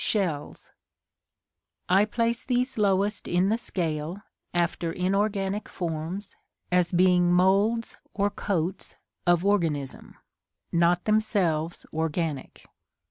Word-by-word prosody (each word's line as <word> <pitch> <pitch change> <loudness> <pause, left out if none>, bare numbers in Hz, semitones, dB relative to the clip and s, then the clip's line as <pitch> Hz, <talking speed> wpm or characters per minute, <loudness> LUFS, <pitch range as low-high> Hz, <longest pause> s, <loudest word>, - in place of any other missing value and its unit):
Shells. 175 -9 -2 1.2
I 195 +3 +5
place 230 +2 -1
these 250 +1 0
lowest 200 +1 +1
in 180 +2 +2
the 220 - +2
scale 165 -1 -3 0.3
(after 170 -1 0
inorganic 195 +2 -1
forms) 175 +4 -4 0.4
as 180 -1 +3
being 180 -1 +4
moulds 200 +6 +2
or 205 0 0
coats 185 -3 -2 0.3
of 175 +1 +3
organism; 165 -9 -1 0.6
not 175 +1 +2
themselves 195 -7 0
organic. 160 -2 -3
185 Hz, 95 wpm, -26 LUFS, 170-205 Hz, 1.2 s, I